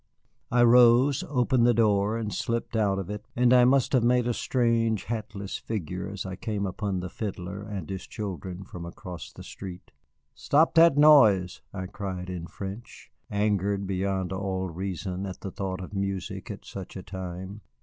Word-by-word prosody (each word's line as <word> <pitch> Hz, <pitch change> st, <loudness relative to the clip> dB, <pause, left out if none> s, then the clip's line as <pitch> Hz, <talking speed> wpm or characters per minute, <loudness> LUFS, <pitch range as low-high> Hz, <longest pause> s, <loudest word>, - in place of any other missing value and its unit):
I 120 Hz, 0 st, +4 dB
rose, 120 Hz, +3 st, +6 dB
opened 125 Hz, -3 st, +3 dB
the 120 Hz, -, +4 dB
door, 105 Hz, -1 st, +2 dB
and 110 Hz, -3 st, -3 dB
slipped 115 Hz, 0 st, -2 dB
out 100 Hz, -3 st, +2 dB
of 95 Hz, 0 st, -4 dB
it, 105 Hz, 0 st, -5 dB
and 125 Hz, 0 st, +4 dB
I 125 Hz, -1 st, +7 dB
must 135 Hz, +1 st, +3 dB
have 125 Hz, -3 st, +4 dB
made 125 Hz, 0 st, +3 dB
a 120 Hz, -, +1 dB
strange, 115 Hz, -4 st, +1 dB
hatless 105 Hz, -3 st, -4 dB
figure 90 Hz, -4 st, -4 dB
as 100 Hz, -2 st, -5 dB
I 95 Hz, -1 st, -5 dB
came 105 Hz, -1 st, -3 dB
upon 95 Hz, 0 st, -2 dB
the 90 Hz, -, -4 dB
fiddler 95 Hz, -1 st, -5 dB
and 100 Hz, -6 st, -6 dB
his 95 Hz, -2 st, -6 dB
children 95 Hz, -2 st, -6 dB
from 90 Hz, -2 st, -9 dB
across 90 Hz, 0 st, -8 dB
the -, -, -11 dB
street. 90 Hz, -2 st, -9 dB, 0.4 s
"Stop 155 Hz, +3 st, +3 dB
that 165 Hz, -3 st, +6 dB
noise," 110 Hz, -, +6 dB
I 95 Hz, -2 st, -5 dB
cried 95 Hz, -2 st, -5 dB
in 85 Hz, -2 st, -5 dB
French, 100 Hz, +6 st, -8 dB, 0.2 s
angered 100 Hz, -1 st, 0 dB
beyond 95 Hz, -1 st, -1 dB
all 95 Hz, -1 st, -2 dB
reason 95 Hz, +2 st, -4 dB
at 95 Hz, -, -8 dB
the 95 Hz, -, -5 dB
thought 95 Hz, -1 st, -4 dB
of 95 Hz, -, -8 dB
music 100 Hz, -2 st, -3 dB
at -, -, -7 dB
such 95 Hz, 0 st, -8 dB
a 95 Hz, -, -7 dB
time. 95 Hz, +2 st, -7 dB
100 Hz, 175 wpm, -27 LUFS, 95-115 Hz, 0.4 s, I